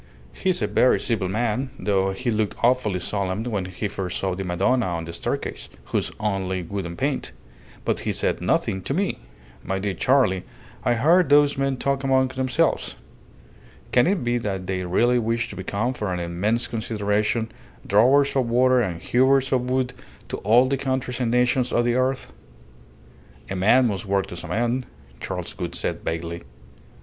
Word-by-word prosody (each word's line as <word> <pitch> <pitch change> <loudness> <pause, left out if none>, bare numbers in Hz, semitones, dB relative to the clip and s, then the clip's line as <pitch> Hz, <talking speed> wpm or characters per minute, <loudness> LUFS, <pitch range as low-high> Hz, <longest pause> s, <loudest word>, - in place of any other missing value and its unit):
He's 185 - 0
a - - +1
very 125 - +3
civil 105 -6 -1
man, 120 +5 -1
though 95 -2 +1
he 120 +6 -2
looked 110 -1 0
awfully 120 -6 +2
solemn 100 +2 -2
when 105 -6 -2
he 95 +3 -4
first 95 -3 -4
saw 95 -1 -1
the 95 +2 -4
Madonna 100 +7 +1
on 85 -2 -2
the 85 - -7
staircase, - - -4
who's - - -2
only 95 -3 -1
wood 95 +1 -4
and 85 0 -8
paint; - - -2 0.5
but - - 0
he - - -2
said - - -1
nothing 95 - 0
to 135 - -3
me. 195 +3 -1 0.4
My 95 - -2
dear 100 0 -2
Charley, 125 -7 +2 0.4
I 120 - +2
heard 165 +7 +4
those 145 0 +5
men 135 -1 0
talk 140 +1 -1
among 130 -1 +3
themselves. 130 -1 0 1.0
Can 125 +5 +4
it 185 -6 +1
be 120 0 +1
that 95 -4 -3
they 95 0 -2
really 120 +8 +3
wish 115 +1 -1
to - - -8
become, 100 +6 -2
for 105 -6 -3
an 90 - -2
immense 90 +7 0
consideration, 105 0 -1 0.3
drawers 135 +8 +4
of 130 -3 +1
water 125 +1 +4
and 90 -7 -2
hewers 130 +7 +3
of 125 -1 +1
wood 130 -1 0 0.4
to - - -3
all 120 +5 +4
the 135 +1 0
countries 130 -2 -2
and 120 -2 0
nations 125 +1 +2
of 120 - +2
the 120 - +2
earth?" 130 +1 -1 1.2
"A - - -1
man 110 +8 +4
must 105 -2 -2
work 100 0 +1
to - - -7
some 85 - -7
end," 120 +3 0 0.3
Charles - - -5
Gould - - -5
said, - - -2
vaguely. 85 +1 -3
115 Hz, 180 wpm, -24 LUFS, 95-130 Hz, 1.2 s, those